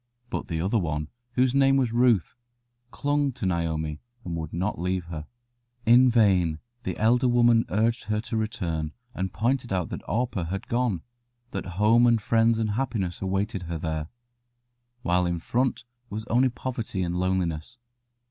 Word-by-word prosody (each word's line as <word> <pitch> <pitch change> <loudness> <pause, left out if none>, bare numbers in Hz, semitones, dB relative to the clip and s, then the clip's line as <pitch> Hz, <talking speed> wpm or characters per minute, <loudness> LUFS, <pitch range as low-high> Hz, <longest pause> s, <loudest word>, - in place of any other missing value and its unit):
But - - -3
the 80 -2 -2
other 100 +7 +1
one, 75 -4 -2 0.2
whose 130 0 +3
name 135 0 +4
was 125 -4 +1
Ruth, 120 -6 +3 0.6
clung 145 +1 0
to 115 - -5
Naomi, 80 -4 -1 0.2
and 85 -2 -3
would 80 -2 -4
not 95 +1 -2
leave 90 +1 -1
her. 80 -3 -7 0.6
In 125 +2 +7
vain 95 -9 +3 0.2
the 125 - -4
elder 120 +3 +3
woman 120 -1 +4
urged 115 +4 +1
her 105 0 0
to 115 - -5
return, 85 -8 -2 0.2
and 95 -3 -3
pointed 120 +2 0
out 90 -3 0
that - - -5
Orpah 115 -6 -1
had 95 +4 -4
gone, 120 -8 0 0.5
that 95 -1 -4
home 115 +4 +5
and 115 -1 +4
friends 115 +1 +3
and 110 -2 0
happiness 110 -7 -2
awaited 95 +1 -1
her 85 - -2
there, 80 -1 -3 1.0
while 90 0 +2
in 85 0 -1
front 125 +9 0 0.3
was 110 +2 -5
only 130 +3 +4
poverty 115 -6 -3
and 85 0 -2
loneliness. 90 +2 -1
105 Hz, 160 wpm, -26 LUFS, 85-120 Hz, 1.0 s, In